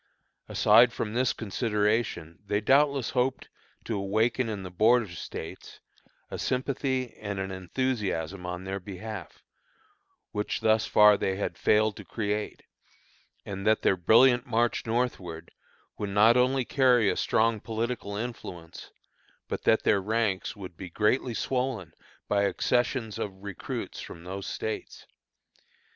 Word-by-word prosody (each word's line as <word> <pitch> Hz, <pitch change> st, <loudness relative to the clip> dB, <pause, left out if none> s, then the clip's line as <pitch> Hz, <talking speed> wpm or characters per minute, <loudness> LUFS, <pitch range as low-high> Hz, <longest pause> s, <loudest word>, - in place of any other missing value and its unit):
Aside 115 Hz, +3 st, +6 dB
from 110 Hz, -1 st, -4 dB
this 125 Hz, +1 st, +2 dB
consideration 105 Hz, -5 st, -1 dB
they 105 Hz, +1 st, +1 dB
doubtless 140 Hz, +2 st, +3 dB
hoped 130 Hz, +1 st, -1 dB, 0.4 s
to 115 Hz, -, -2 dB
awaken 110 Hz, +5 st, +1 dB
in 105 Hz, -3 st, -4 dB
the 90 Hz, -, -7 dB
Border 110 Hz, +4 st, +3 dB
States 85 Hz, -, -8 dB, 0.5 s
a -, -, -5 dB
sympathy 130 Hz, -1 st, -1 dB
and 100 Hz, -2 st, -5 dB
an 95 Hz, 0 st, -3 dB
enthusiasm 95 Hz, -3 st, -2 dB
on 90 Hz, 0 st, -5 dB
their 95 Hz, +1 st, -4 dB
behalf, 105 Hz, +3 st, -8 dB, 0.9 s
which 105 Hz, -1 st, -2 dB
thus 110 Hz, 0 st, +3 dB
far 105 Hz, -1 st, +6 dB
they 95 Hz, -, -1 dB
had 100 Hz, -, -3 dB
failed 110 Hz, 0 st, +2 dB
to -, -, -8 dB
create; 105 Hz, -1 st, -3 dB, 0.8 s
and 95 Hz, -1 st, -5 dB
that 110 Hz, 0 st, +3 dB
their -, -, +4 dB
brilliant 120 Hz, +7 st, +5 dB
march 120 Hz, -2 st, 0 dB
northward 100 Hz, -9 st, -2 dB, 0.5 s
would 105 Hz, -, -2 dB
not 105 Hz, +4 st, +5 dB
only 130 Hz, +1 st, +2 dB
carry 125 Hz, -5 st, +4 dB
a -, -, +2 dB
strong 115 Hz, 0 st, +2 dB
political 115 Hz, -1 st, -3 dB
influence, 100 Hz, -7 st, -7 dB, 0.6 s
but -, -, -5 dB
that 110 Hz, -, +4 dB
their 100 Hz, -, +3 dB
ranks 105 Hz, -1 st, -1 dB
would 95 Hz, -4 st, -9 dB
be 90 Hz, +2 st, -8 dB
greatly 110 Hz, +6 st, +1 dB
swollen 125 Hz, -11 st, -2 dB, 0.3 s
by 100 Hz, -1 st, +2 dB
accessions 120 Hz, 0 st, 0 dB
of 95 Hz, -1 st, -5 dB
recruits 100 Hz, -2 st, -5 dB
from 85 Hz, -, -10 dB
those 95 Hz, +2 st, -6 dB
States. 110 Hz, -, -5 dB
110 Hz, 135 wpm, -28 LUFS, 95-120 Hz, 0.9 s, Aside